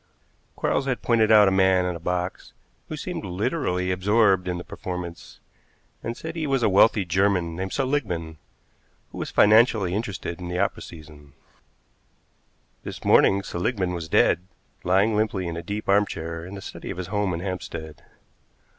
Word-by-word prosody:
Quarles 135 - 0
had 130 -2 -2
pointed 115 -2 +3
out 105 -2 +7
a - - +3
man 95 -1 +3
in 90 -1 -2
a - - -7
box 90 +2 -3 0.4
who - - -5
seemed - - -5
literally 90 - -1
absorbed 95 0 +2
in 90 -1 -2
the 90 - -6
performance, 90 -2 -7 0.6
and 115 +1 -5
said 160 +1 -7
he 160 -2 -2
was 135 -3 +1
a - - +4
wealthy 100 +1 +4
German 90 -2 +1
named 95 +2 -4
Seligmann, 100 - -2 0.7
who - - -8
was - - -4
financially 105 -3 +4
interested 100 -5 -4
in 90 - -5
the 90 0 -3
opera - - 0
season. 75 -3 -13 1.5
This - - -8
morning 100 0 +5
Seligmann 95 0 -2
was 85 -2 -5
dead, 90 +3 +3 0.4
lying 100 +4 +3
limply 105 -3 0
in 85 -1 -4
a 85 - -4
deep 100 +5 -5
arm 100 +1 +4
chair 85 0 -6
in 95 - -8
the 95 - -8
study - - -8
of - - -5
his 95 - -4
home 105 -2 +1
in 85 - -3
Hampstead. 85 -5 -6
95 Hz, 170 wpm, -24 LUFS, 90-105 Hz, 1.5 s, out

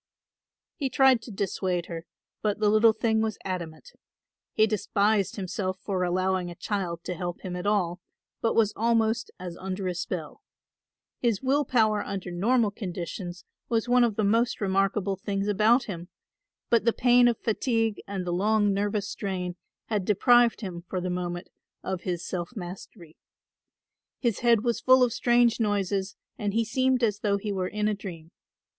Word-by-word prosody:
He 275 -4 -1
tried 260 -2 +4
to 230 - -10
dissuade 185 -3 -2
her, 165 0 -7 0.3
but 210 -2 0
the 215 -1 +2
little 220 +1 +6
thing 220 0 +1
was 220 -2 -1
adamant. 180 - -5 0.6
He 215 - +4
despised 205 -1 +1
himself 185 -1 -3
for 190 -1 -2
allowing 185 0 0
a 175 - -8
child 175 -4 -3
to - - -3
help 175 0 -5
him 180 -1 -5
at 180 +2 -4
all, 180 -4 0 0.4
but 225 - +1
was 215 -2 +3
almost 225 0 +1
as 180 -2 -6
under 190 0 -4
a 180 - -1
spell. 175 - -5 0.8
His 235 -2 0
will 280 +3 +2
power 220 -4 +2
under 195 -2 -5
normal 215 +5 +2
conditions 180 -2 -6 0.2
was 230 0 0
one 245 0 +5
of 230 -3 +1
the 215 - 0
most 230 +4 +2
remarkable 195 0 0
things 195 +1 -2
about 215 +5 +4
him; 175 -6 -7 0.6
but 235 -3 +4
the 235 0 +3
pain 245 -1 +5
of 235 -2 +2
fatigue 225 -1 0
and 195 -2 -4
the 175 - -2
long 205 +2 +2
nervous 205 0 -1
strain 180 -4 -4 0.3
had 210 -3 -1
deprived 235 +5 +4
him 175 -4 -6
for 185 - -2
the 180 0 -3
moment 175 0 -4 0.3
of 190 -2 -3
his 175 -2 -3
self 180 +5 -4
mastery. 175 -3 -9 1.0
His 235 -5 0
head 235 -3 +3
was 235 -2 0
full 255 0 +6
of 240 -2 +2
strange 240 -1 +3
noises 200 -2 0 0.2
and 205 -1 -2
he 230 0 +2
seemed 255 +2 +1
as 210 -3 +1
though 205 -2 +1
he 205 +1 -4
were 185 -2 -1
in 210 +2 -1
a 215 - +1
dream. 175 -5 -8
205 Hz, 170 wpm, -27 LUFS, 185-225 Hz, 1.0 s, little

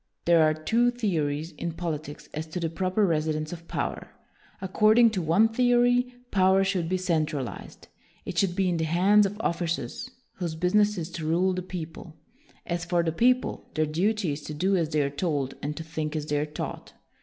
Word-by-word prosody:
There 170 -1 +5
are 155 0 +4
two 230 +10 +2
theories 165 -10 -1
in 170 -1 -3
politics 155 -3 -5
as 155 +1 -4
to 160 +3 -5
the 165 -2 -2
proper 185 +4 +1
residence 155 -2 -1
of 170 -1 -10
power. - - -3 0.5
Accord 215 +3 +3
ing 235 -2 +7
to 195 -4 -2
one 170 +7 +4
theory, 245 +1 +3 0.2
power 190 0 +4
should 185 -4 -1
be 185 - +1
cen 170 -4 +1
tralized; 135 -5 -6 0.4
it - - -5
should 185 -3 +1
be 190 -1 +1
in 175 -2 +1
the 160 - 0
hands 195 +6 +4
of 205 +2 -8
officers 170 +9 -2 0.3
whose 170 -3 -3
business 205 +5 +2
is 170 0 -4
to 160 -2 -5
rule 180 +4 +2
the 185 - -2
peo 180 -2 -5
ple; 160 -1 -12 0.5
as 170 -1 -2
for 170 0 +1
the 165 - 0
people, 250 +9 +1
their 155 - +2
duty 185 +4 0
is 145 +2 -4
to 150 - -7
do 190 +6 +1
as 165 -4 0
they 150 -2 +1
are 140 - -2
told 145 -3 -1
and 150 +1 -4
to 165 - -4
think 155 -1 -4
as 150 -1 -2
they 150 -1 0
are 150 - -1
taught. 150 - -6
170 Hz, 205 wpm, -27 LUFS, 155-195 Hz, 0.5 s, ing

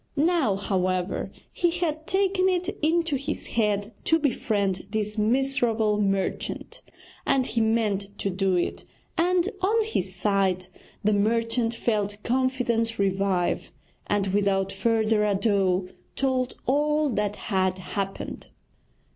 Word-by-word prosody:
Now, 305 - +2
however, 185 -2 -1 0.2
he 350 - +2
had 320 -2 -2
taken 380 -1 +2
it 365 -1 0
into 330 0 +2
his 275 - -4
head 210 -1 0
to 325 - +4
befriend 205 - 0
this 210 0 -2
miserable 225 -2 +2
merchant, 195 -1 -2 0.4
and 270 -2 +2
he 230 -2 0
meant 210 -3 0
to 195 - -1
do 190 0 +1
it; 175 - -1 0.3
and 355 +1 +2
on 435 +4 +3
his 190 - -2
side 190 -1 +1 0.3
the 210 +1 +3
merchant 230 +3 +1
felt 210 -3 -1
confidence 245 -3 +1
revive, 195 -2 0 0.4
and 205 -1 +1
without 195 -1 +1
further 220 +1 +2
ado 195 -3 +1 0.3
told 260 -2 0
all 300 +3 +2
that 210 -2 -1
had 190 -4 0
happened. 195 +1 -5
215 Hz, 120 wpm, -26 LUFS, 195-270 Hz, 0.4 s, to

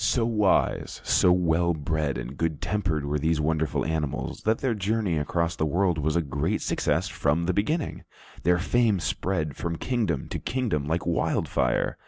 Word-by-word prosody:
So 115 +2 +2
wise, 105 -4 +1
so 90 - +4
well 85 -1 +2
bred 75 -2 -1
and - - -6
good 80 -1 -1
tempered 85 -4 -1
were 75 +1 -1
these 80 +1 +1
wonderful 80 -1 0
animals, 80 -3 -2
that 110 +1 +3
their 130 -3 0
journey 105 -4 0
across 85 +3 -1
the - - -1
world 90 +1 +1
was 75 +2 0
a 85 - +2
great 70 -1 -1
success 85 +6 0
from 80 0 0
the 90 - +1
beginning. 150 - -1 0.4
Their 90 +2 +3
fame 110 +2 +2
spread 80 -5 -2
from 85 -1 -3
kingdom 105 - -1
to - - -3
kingdom 110 - -1
like 80 +2 -1
wild 85 -1 0
fire. - - 0
85 Hz, 175 wpm, -26 LUFS, 75-100 Hz, 0.4 s, so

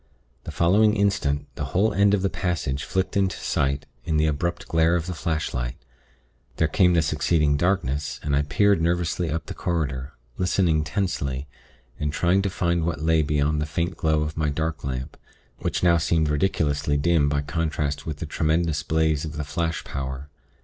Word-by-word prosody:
The - - -5
following 105 +5 +3
instant, 100 -9 +1
the - - -5
whole 110 +3 +3
end 100 0 +4
of 95 - -2
the 95 - +2
passage 80 -7 -2
flicked 95 0 -1
into 95 -2 +1
sight 70 +1 -1 0.2
in 80 -2 0
the 75 - +3
abrupt 80 +3 -1
glare 80 +1 +3
of 85 -2 -1
the 90 - -4
flashlight. 80 -8 -2 0.8
There 80 - +2
came 90 +3 +3
the 80 - +3
succeeding 75 -1 +2
darkness, 75 -4 0
and 70 -1 0
I 70 - +3
peered 100 +5 +2
nervously 85 0 0
up 80 +2 -2
the - - -6
corridor, 70 -5 -2 0.3
listening 90 -4 +2
tensely, 75 -6 -2 0.5
and 75 -1 -1
trying 90 +5 +2
to 100 - -1
find 85 -2 0
what 80 -3 -2
lay 80 0 +3
beyond 75 0 +1
the 75 - -2
faint 85 +3 -2
glow 80 -1 +1
of 75 +2 -5
my 75 -1 +1
dark 80 +1 -2
lamp, 65 +1 -4 0.4
which - - -2
now 85 -1 +5
seemed 80 -1 +1
ridiculously 75 -2 +1
dim 75 -1 +3
by 70 0 0
contrast 75 -1 -2
with 75 -2 -3
the 80 - -5
tremendous 80 0 0
blaze 80 -1 +1
of 80 -1 -5
the 75 - -2
flash 80 +3 -2
power.... 65 +1 -5
80 Hz, 180 wpm, -24 LUFS, 75-85 Hz, 0.8 s, now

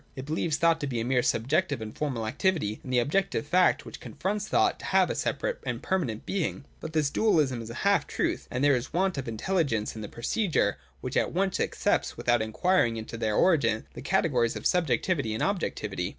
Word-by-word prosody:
It 130 - -6
believes 155 +1 -1
thought 165 -1 +3
to 145 - -2
be 120 -4 -2
a 115 - -2
mere 125 0 +2
subjective 140 +6 +1
and 110 -1 -7
formal 130 -7 -2
activity, 130 - 0
and 130 - -6
the 125 - +2
objective 150 +4 +1
fact, 180 +4 +3
which - - -9
confronts 205 +2 -3
thought, - - +2
to - - -8
have - - +3
a - - -2
separate - - -2
and - - -4
permanent 140 - -1
being. 165 -6 -2
But 160 - -7
this 150 -3 +1
dualism 150 - +2
is 115 - -8
a 115 - -7
half 200 0 +3
truth: - - -2
and 130 +3 -2
there 145 -1 +5
is 125 +1 -2
a 170 - -3
want 190 -5 +1
of 130 - -5
intelligence 115 - -1
in 110 - -6
the 105 - -6
procedure 155 - 0 0.2
which - - -5
at - - +1
once 190 +1 0
accepts, - - 0
without 120 -1 +2
inquiring 115 +2 +1
into 110 +1 -6
their 110 -2 -1
origin, 135 -12 +3
the - - -8
categories 135 -7 +1
of - - -7
subjectivity 145 -6 +1
and - - -1
objectivity. 110 - -2
140 Hz, 210 wpm, -28 LUFS, 115-180 Hz, 0.2 s, there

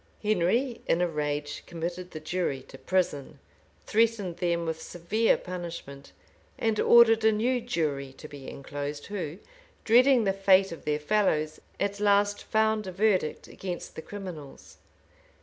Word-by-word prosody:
Henry, 215 +5 +1
in 165 - +2
a 180 - +2
rage, 150 -2 -3
committed 175 +2 -5
the 155 - -7
jury 155 -4 -2
to - - -14
prison, 175 -7 -1 0.5
threatened 215 -6 +1
them 170 -1 0
with 160 0 -3
severe 200 +9 +1
punishment, 170 -6 -7 0.5
and 225 -1 0
ordered 225 -2 +6
a 220 - +6
new 240 +4 +1
jury 150 - -2
to 155 - -11
be 145 -3 -9
enclosed, 145 +1 -6
who, 180 -6 -5 0.5
dreading 250 +2 +5
the 195 -2 +1
fate 195 -1 +4
of 165 - -9
their 150 0 +1
fellows, 155 -3 +1 0.2
at 200 0 -1
last 205 0 +3
found 220 -1 +1
a - - -4
verdict 190 -4 +1
against 180 -2 -6
the - - -6
criminals. 175 -8 -9
180 Hz, 145 wpm, -28 LUFS, 155-210 Hz, 0.5 s, ordered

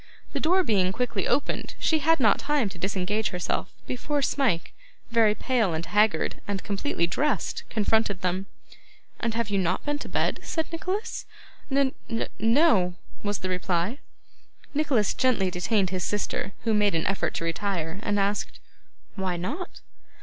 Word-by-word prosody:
The - - 0
door 365 +4 +3
being 190 - +2
quickly 225 -2 -1
opened, 285 - 0
she 315 - +2
had 325 +1 +3
not 215 -6 +4
time 285 -7 +1
to 185 - -11
disengage 195 +3 0
herself, 180 -1 -2
before 285 +3 -1
Smike, 250 -12 +1 0.4
very 225 -2 +4
pale 225 -11 +1
and 160 +1 -3
haggard, 210 +1 +2
and 200 -2 -2
completely 200 -2 0
dressed, 255 - 0
confronted 215 -2 +1
them. 185 +2 -1 0.7
'And 230 -1 -1
have 230 -3 -1
you 200 - +2
not 185 0 0
been 290 0 -1
to - - -7
bed?' - - 0
said 320 -1 -2
Nicholas. 380 +7 -3 0.4
'N 275 -1 +2 0.2
n 225 -1 -1
no,' 225 - +4 0.3
was 205 -1 -1
the - - 0
reply. 185 - 0 0.7
Nicholas 280 -9 +2
gently 225 -8 +2
detained 190 +1 +1
his 185 -2 -1
sister, 200 +1 -2
who 225 -2 +2
made 210 -3 +3
an 160 - 0
effort 195 - 0
to - - -2
retire; 170 0 -2
and 205 -2 +1
asked, 200 +1 -1 0.6
'Why 185 -3 -1
not? 295 - -5
210 Hz, 155 wpm, -27 LUFS, 185-260 Hz, 0.7 s, not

